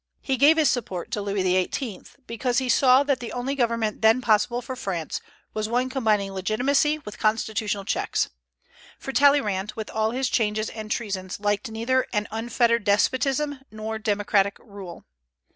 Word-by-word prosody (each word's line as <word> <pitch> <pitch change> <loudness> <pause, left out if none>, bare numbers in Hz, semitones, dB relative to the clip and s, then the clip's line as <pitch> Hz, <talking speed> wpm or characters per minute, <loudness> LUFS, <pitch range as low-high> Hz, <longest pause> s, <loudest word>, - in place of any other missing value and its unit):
He 265 - -1
gave 290 +5 +5
his 310 -2 +4
support 190 -8 -2
to 210 - -2
Louis 200 -1 -1
XVIII., 185 +5 -1 0.2
because 240 +1 -2
he 260 0 0
saw 255 +2 +5
that 280 -2 0
the 240 - -6
only 250 +2 -2
government 230 -5 -1
then 220 +2 +5
possible 235 0 +2
for 255 +2 -6
France 185 - -4 0.3
was 215 0 -2
one 250 +2 0
combining 215 -7 +1
legitimacy 250 +10 +1
with 210 -9 -10
constitutional 215 -2 0
checks; - - -1 0.7
for 270 - -6
Talleyrand, 215 -9 +3
with 220 -1 -6
all 220 0 +1
his 255 +3 -1
changes 215 -2 0
and 215 -1 -7
treasons, 195 -5 -3
liked 205 +1 -1
neither 235 +4 0
an 210 -1 0
unfettered 235 0 +1
despotism 270 +7 +1
nor 220 0 -5
democratic 205 -2 +1
rule. 200 -6 -11
220 Hz, 160 wpm, -25 LUFS, 205-255 Hz, 0.7 s, gave